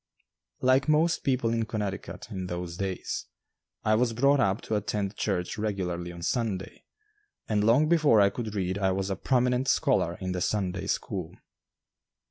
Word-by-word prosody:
Like 130 +2 +3
most 160 +2 +3
people 125 -4 +1
in 115 -1 0
Connecticut 105 0 -5
in 95 -2 -4
those 90 -1 -4
days, 95 0 -3 0.6
I 110 - +3
was 115 +1 +2
brought 140 +4 +3
up 100 -2 +1
to - - -5
attend 105 -1 -2
church 95 0 -2
regularly 90 -5 -2
on 85 -1 -9
Sunday, 105 -2 -2 0.6
and 105 -1 +1
long 120 +8 +4
before 155 -9 +5
I 100 -1 +5
could 110 -3 -5
read 95 0 -1
I 95 -1 +2
was 95 +1 -2
a - - 0
prominent 125 +4 +1
scholar 95 - +2
in 95 -1 -3
the 90 -1 -2
Sunday 95 -2 -1
school. - - -3
105 Hz, 160 wpm, -28 LUFS, 95-125 Hz, 0.6 s, before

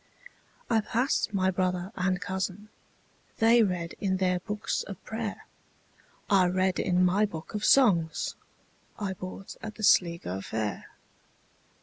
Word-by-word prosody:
I 225 -2 +3
passed 245 +4 0
my 190 -2 +1
brother 185 0 -1
and 185 -1 0
cousin:They 205 +4 -1
read 180 -5 -1
in 190 -2 +1
their 180 -1 +1
books 210 +3 -3
of 195 - -7
prayer;I 205 -3 -3
read 185 +1 +1
in 180 -1 +2
my 200 +4 +3
book 160 -5 -8
of 210 - -3
songsI 190 -12 +3 0.9
bought 185 +1 -8
at 215 -1 -7
the 215 - -8
Sligo 170 - +3
fair. 105 0 -4
190 Hz, 115 wpm, -28 LUFS, 180-210 Hz, 0.9 s, I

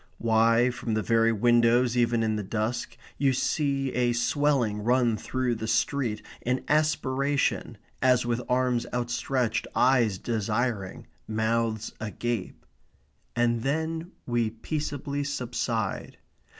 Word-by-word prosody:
Why, 115 +2 +3
from 115 -2 -3
the 110 - 0
very 115 +1 +3
windows, 120 +2 +3
even 120 -1 +2
in 110 -1 0
the 105 - -2
dusk, 110 +4 -3 0.2
you 135 -2 +3
see 135 0 0
a 120 -1 +2
swelling 120 -3 +1
run 120 -1 +3
through 130 +3 -1
the 110 -1 -4
street, 120 -1 0 0.2
an 125 +2 -1
aspiration, 145 -2 +1 0.2
as 125 -1 +4
with 120 0 -1
arms 125 -1 +1
outstretched, 120 0 -1
eyes 120 -6 +3
desiring, 110 -1 -2 0.2
mouths 110 0 -1
agape. 110 -1 -4 0.7
And 120 -1 +1
then 160 +5 -2 0.2
we 120 -2 0
peaceably 145 +4 -3
subside. 120 -6 -3
120 Hz, 115 wpm, -27 LUFS, 115-130 Hz, 0.7 s, as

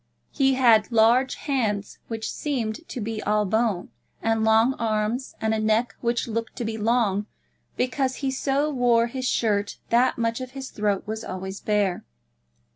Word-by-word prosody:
He 270 -2 +2
had 235 -4 +4
large 235 +4 +4
hands, 220 -8 -2
which 225 -1 -4
seemed 260 -1 -3
to 255 - -5
be 220 0 -3
all 210 0 +1
bone, 220 -2 0 0.3
and 225 -1 +1
long 220 +3 +4
arms, 225 +3 -1
and 220 0 0
a 220 - 0
neck 220 +3 +1
which 235 0 0
looked 230 0 -3
to 240 - -4
be 220 0 -3
long 215 -2 +1 0.5
because 260 +1 0
he 270 -2 -2
so 275 +3 0
wore 240 -3 +3
his 255 +2 -3
shirt 205 -3 0
that 240 +2 +3
much 230 +1 -1
of 255 0 -7
his 270 -1 -6
throat 205 -2 0
was 220 +1 -4
always 190 0 -6
bare. 205 -4 0
225 Hz, 165 wpm, -25 LUFS, 215-255 Hz, 0.5 s, had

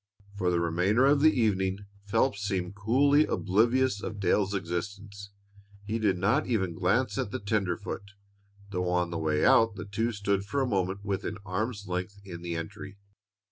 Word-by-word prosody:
For 95 -3 0
the 85 -1 +1
remainder 90 +9 +2
of 140 +1 +4
the 155 +1 +7
evening 95 -2 0 0.2
Phelps 110 0 +1
seemed 95 -3 -2
coolly 135 +9 +3
oblivious 115 +3 +2
of 105 -2 -5
Dale's 100 +1 +1
existence. 100 +3 -5 0.6
He 110 +2 -2
did 100 -4 +2
not 110 +11 +1
even 95 -8 0
glance - - +1
at - - -1
the - - -3
tenderfoot, 100 0 -3 0.6
though 90 -2 -1
on 90 -1 0
the 85 - -3
way 75 -1 +1
out 115 -2 +5
the 100 - -6
two 110 +4 -1
stood 100 -2 -1
for 105 +8 -2
a 135 - +2
moment 100 -3 -1
within 100 +1 -3
arm's 100 +2 -3
length 90 +3 -4
in 85 -3 -8
the 85 -1 -4
entry. 95 +4 -7
100 Hz, 170 wpm, -28 LUFS, 95-110 Hz, 0.6 s, the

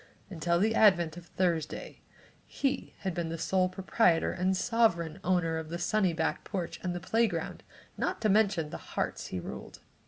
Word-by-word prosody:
Until 170 0 +1
the 220 +4 +2
advent 175 -8 +4
of 175 -1 -11
Thursday 170 -4 -2 0.5
he 270 -1 -2
had 190 -2 -2
been 165 -1 -3
sole 185 +3 +1
proprietor 185 -2 +2
and 185 +1 0
sovereign 175 -9 +1
owner 175 -3 +1
of 160 -1 -7
the 170 - -3
sunny 190 +1 +2
back 160 -1 -1
porch 185 -4 -4
and 175 -1 -2
playground, 205 -6 0 0.4
not - - -1
to 220 - +2
mention 195 -7 +2
the - - -4 0.2
hearts - - -1
he 95 - -4
ruled. - - -8
180 Hz, 160 wpm, -30 LUFS, 165-195 Hz, 0.5 s, advent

